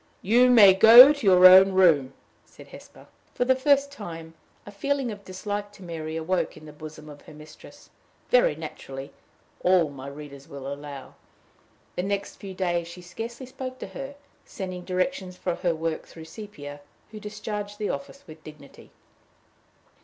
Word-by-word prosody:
"You 240 Hz, +6 st, +4 dB
may 210 Hz, -6 st, +8 dB
go 235 Hz, +8 st, +9 dB
to 280 Hz, -8 st, -4 dB
your 185 Hz, -1 st, +6 dB
own 190 Hz, +1 st, +8 dB
room," 155 Hz, -8 st, +3 dB, 0.3 s
said -, -, -17 dB
Hesper. -, -, -15 dB, 0.3 s
For 245 Hz, -, 0 dB
the 260 Hz, +1 st, +3 dB
first 280 Hz, +1 st, +2 dB
time, 165 Hz, -, -9 dB, 0.3 s
a 205 Hz, -, -10 dB
feeling 270 Hz, +4 st, -2 dB
of 205 Hz, -1 st, -10 dB
dislike 205 Hz, +2 st, -6 dB
to 195 Hz, -, -15 dB
Mary 160 Hz, -2 st, -6 dB
awoke 175 Hz, +2 st, -2 dB
in 155 Hz, -, -14 dB
the 150 Hz, -, -12 dB
bosom 155 Hz, 0 st, -11 dB
of 145 Hz, -1 st, -13 dB
her 155 Hz, -, -15 dB
mistress 155 Hz, 0 st, -16 dB, 0.4 s
very 245 Hz, -11 st, +4 dB
naturally, 140 Hz, -3 st, -9 dB, 0.5 s
all 180 Hz, -4 st, +3 dB
my 135 Hz, -1 st, -10 dB
readers 140 Hz, -1 st, -11 dB
will 140 Hz, -1 st, -10 dB
allow. 140 Hz, -1 st, -10 dB, 0.8 s
The -, -, -2 dB
next 200 Hz, +1 st, -4 dB
few 195 Hz, -2 st, -9 dB
days 175 Hz, -2 st, -2 dB
she 175 Hz, +1 st, -11 dB
scarcely 230 Hz, +8 st, -8 dB
spoke 255 Hz, 0 st, -8 dB
to -, -, -8 dB
her, 275 Hz, +1 st, -8 dB, 0.3 s
sending 185 Hz, -3 st, -8 dB
directions 185 Hz, 0 st, -3 dB
for 180 Hz, -, -3 dB
her 175 Hz, -1 st, -2 dB
work 160 Hz, 0 st, -4 dB
through 160 Hz, -1 st, -12 dB
Sepia, 150 Hz, -8 st, -10 dB, 0.3 s
who 215 Hz, -, -9 dB
discharged 210 Hz, -1 st, -7 dB
the 210 Hz, -1 st, -2 dB
office 140 Hz, -1 st, -8 dB
with 155 Hz, 0 st, -14 dB
dignity. 150 Hz, -2 st, -15 dB
185 Hz, 165 wpm, -25 LUFS, 155-210 Hz, 0.8 s, go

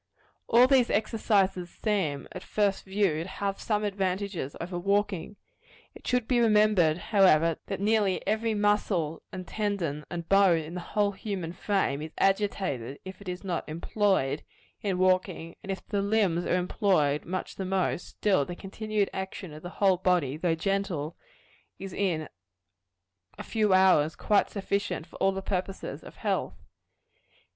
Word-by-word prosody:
All 240 Hz, +2 st, +6 dB
these 260 Hz, -2 st, +4 dB
exercises 200 Hz, -5 st, +1 dB
seem, 180 Hz, -12 st, -1 dB
at -, -, -7 dB
first 205 Hz, -2 st, 0 dB
view, 190 Hz, -5 st, +1 dB
to 170 Hz, -, -5 dB
have 195 Hz, +1 st, -3 dB
some 210 Hz, -1 st, 0 dB
advantages 195 Hz, -6 st, -2 dB
over 175 Hz, +1 st, -4 dB
walking. 200 Hz, 0 st, 0 dB, 0.6 s
It -, -, -13 dB
should 250 Hz, -2 st, +1 dB
be 250 Hz, -2 st, +3 dB
remembered 210 Hz, -8 st, +4 dB
however, 165 Hz, -6 st, +3 dB
that 195 Hz, -, -3 dB
nearly 205 Hz, -2 st, +1 dB
every 220 Hz, +1 st, 0 dB
muscle, 205 Hz, -6 st, +1 dB
and 185 Hz, -1 st, -7 dB
tendon, 190 Hz, -9 st, -2 dB
and 170 Hz, -1 st, -5 dB
bone 195 Hz, -3 st, +5 dB
in 155 Hz, +2 st, -8 dB
the 180 Hz, -, -4 dB
whole 205 Hz, +3 st, 0 dB
human 190 Hz, -4 st, -5 dB
frame, 185 Hz, -8 st, 0 dB
is 155 Hz, +1 st, -7 dB
agitated, 190 Hz, -, 0 dB
if 190 Hz, +1 st, -9 dB
it 195 Hz, -, -7 dB
is 180 Hz, +2 st, -5 dB
not 175 Hz, -5 st, -3 dB
employed, 165 Hz, -3 st, 0 dB, 0.4 s
in 195 Hz, -3 st, -1 dB
walking; 185 Hz, -2 st, +1 dB
and 195 Hz, -, -5 dB
if 195 Hz, -, -5 dB
the 200 Hz, -1 st, -1 dB
limbs 200 Hz, -5 st, +1 dB
are -, -, +1 dB
employed 180 Hz, -6 st, +1 dB
much 185 Hz, +2 st, -5 dB
the 195 Hz, -, -3 dB
most, 185 Hz, -1 st, -1 dB
still 195 Hz, -8 st, +1 dB
the 175 Hz, +5 st, -6 dB
continued 210 Hz, +2 st, -2 dB
action 190 Hz, -3 st, -5 dB
of 155 Hz, -, -10 dB
the 175 Hz, -, -7 dB
whole 195 Hz, -2 st, +4 dB
body, 175 Hz, -7 st, +1 dB
though 165 Hz, +1 st, 0 dB
gentle, 175 Hz, -4 st, -2 dB, 0.6 s
is 195 Hz, -2 st, -7 dB
in 165 Hz, -6 st, -1 dB, 1.1 s
a -, -, -6 dB
few 215 Hz, -3 st, +1 dB
hours 185 Hz, -5 st, +5 dB
quite 210 Hz, -, +2 dB
sufficient 200 Hz, -4 st, -2 dB
for 170 Hz, -, -13 dB
all 195 Hz, -, +3 dB
the 195 Hz, 0 st, -5 dB
purposes 190 Hz, 0 st, -4 dB
of -, -, -12 dB
health. -, -, -2 dB
190 Hz, 155 wpm, -28 LUFS, 170-205 Hz, 1.1 s, All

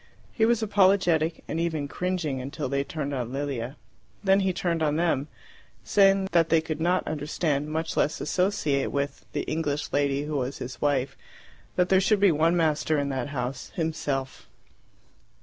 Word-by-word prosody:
He 220 Hz, -1 st, +3 dB
was 235 Hz, -1 st, +2 dB
apologetic, 185 Hz, -6 st, +3 dB
and 160 Hz, -, -2 dB
even 160 Hz, -4 st, -1 dB
cringing, 170 Hz, -5 st, -2 dB
until 140 Hz, +2 st, -4 dB
they 140 Hz, +1 st, 0 dB
turned 145 Hz, -1 st, -4 dB
on 125 Hz, -3 st, -3 dB
Lilia. 135 Hz, -2 st, -3 dB, 0.5 s
Then 195 Hz, 0 st, +4 dB
he 190 Hz, -1 st, +1 dB
turned 170 Hz, -2 st, -1 dB
on 150 Hz, -1 st, +1 dB
them, 160 Hz, -4 st, +1 dB, 0.6 s
saying 195 Hz, -1 st, +4 dB
that 165 Hz, -2 st, +3 dB
they 165 Hz, -, +5 dB
could 160 Hz, -1 st, -4 dB
not 180 Hz, +2 st, +2 dB
understand, 150 Hz, -1 st, -1 dB
much 160 Hz, +1 st, -2 dB
less 150 Hz, -, +1 dB
associate 155 Hz, -4 st, 0 dB
with, 140 Hz, 0 st, -3 dB
the -, -, -1 dB
English 150 Hz, -2 st, -2 dB
lady 140 Hz, 0 st, +1 dB
who 150 Hz, 0 st, -2 dB
was 130 Hz, +1 st, -2 dB
his 125 Hz, -1 st, -7 dB
wife; 135 Hz, -2 st, +1 dB, 0.6 s
that 180 Hz, 0 st, +2 dB
there 190 Hz, 0 st, +5 dB
should 205 Hz, +1 st, +3 dB
be 200 Hz, -2 st, +5 dB
one 165 Hz, +3 st, +2 dB
master 155 Hz, -1 st, +1 dB
in 140 Hz, -1 st, 0 dB
that 135 Hz, +1 st, -2 dB
house 130 Hz, -2 st, -4 dB
himself. 150 Hz, -6 st, -3 dB
155 Hz, 165 wpm, -26 LUFS, 140-175 Hz, 0.6 s, they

